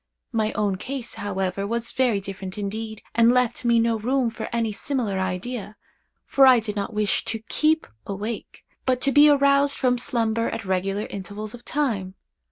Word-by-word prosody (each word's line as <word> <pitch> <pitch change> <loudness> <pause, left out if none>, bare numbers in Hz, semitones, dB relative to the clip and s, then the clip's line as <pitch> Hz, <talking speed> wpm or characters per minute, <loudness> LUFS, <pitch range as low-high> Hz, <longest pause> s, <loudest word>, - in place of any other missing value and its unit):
My 220 -2 0
own 200 -3 0
case, 255 +3 -4
however, 195 -2 -2
was 235 +2 -2
very 245 -6 +2
different 195 -1 -7
indeed, 215 +2 -5
and 230 0 +5
left 250 -1 +1
me 235 -1 +4
no 230 -1 +2
room 250 +1 +1
for 225 -1 -6
any 230 -2 0
similar 215 -3 -2
idea; 200 +3 -3 0.5
for 270 -1 +5
I 255 -2 +7
did 210 -2 -4
not 200 +2 -2
wish 210 -1 +1
to 225 -1 -3
keep 315 +1 +2 0.2
awake, 205 +3 -5 0.2
but 255 -1 +2
to 275 - +3
be 290 +2 +7
aroused 280 0 +4
from 250 -1 +2
slumber 230 -1 0
at - - -5
regular 195 +2 -1
intervals 205 +2 -7
of 245 - -11
time. 215 -10 -1
225 Hz, 175 wpm, -24 LUFS, 200-250 Hz, 0.5 s, I